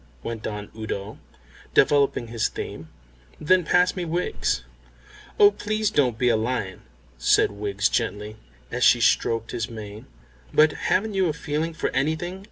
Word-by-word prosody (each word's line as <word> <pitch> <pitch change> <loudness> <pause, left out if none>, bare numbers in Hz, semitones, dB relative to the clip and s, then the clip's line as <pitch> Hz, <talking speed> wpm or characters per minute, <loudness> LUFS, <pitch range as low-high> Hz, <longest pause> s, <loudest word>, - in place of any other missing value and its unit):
went 115 -2 -5
on 105 -1 -6
Udo, 110 -2 -5 0.6
developing 140 -5 +3
his 115 -1 0
theme. - - -7 0.5
"Then 180 +4 +3
pass 180 +3 +3
me 180 - -3
Wiggs." 165 - -1 0.8
"Oh, 205 0 +8
please 215 +1 -1
don't 130 - +2
be 125 - +1
a 120 - +4
lion," 110 -4 -2 0.4
said 60 - +3
Wiggs 100 0 -1
gently, 105 +1 -2 0.4
as - - -1
she - - +6
stroked 115 0 +1
his 115 +1 -3
mane. 105 -2 -9 0.4
"But 155 0 +5 0.2
haven't 215 +2 +1
you 190 -2 +2
a 155 - -1
feeling 155 +1 -3
for - - -2
anything?" 160 +7 -1
130 Hz, 150 wpm, -24 LUFS, 110-175 Hz, 0.8 s, Oh